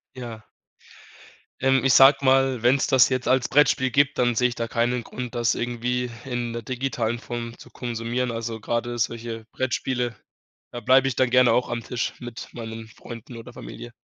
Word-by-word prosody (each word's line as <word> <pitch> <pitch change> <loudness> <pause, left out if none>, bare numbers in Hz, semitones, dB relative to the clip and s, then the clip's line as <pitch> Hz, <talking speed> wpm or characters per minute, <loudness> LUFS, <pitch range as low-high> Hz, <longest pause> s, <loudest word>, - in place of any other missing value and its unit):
Ja. 115 -4 -8 1.2
Ähm, 135 0 +3
ich 130 - +5
sage 135 +1 +8
mal, 130 -2 +3
wenn's 130 +3 +3
das 130 -2 +5
jetzt 130 -1 -1
als 130 -2 +2
Brettspiel 130 -2 +3
gibt, 145 +2 +2
dann 120 -1 +2
sehe 125 +2 +3
ich 120 - -6
da 115 -1 -3
keinen 120 +1 0
Grund, 125 +1 -7
das 120 0 +1
irgendwie 120 +1 -2 0.2
in 120 -2 -3
der 115 - -4
digitalen 120 -2 -2
Form 120 0 -6
zu - - -15
konsumieren. 120 +1 -3
Also, 115 -1 -4
grade 120 +2 -2
solche 115 0 -3
Brettspiele, 125 -2 -2 0.6
da 120 - -5
bleib 130 +2 +4
ich 130 - -1
dann 130 -2 +2
gerne 125 -1 +5
auch 125 - +1
am 120 -1 -3
Tisch 120 +1 -3
mit 120 -1 -8
meinen 115 -1 -7
Freunden 115 +1 -11
oder 115 - -11
Familie. 120 0 -9
120 Hz, 180 wpm, -24 LUFS, 115-130 Hz, 1.2 s, sage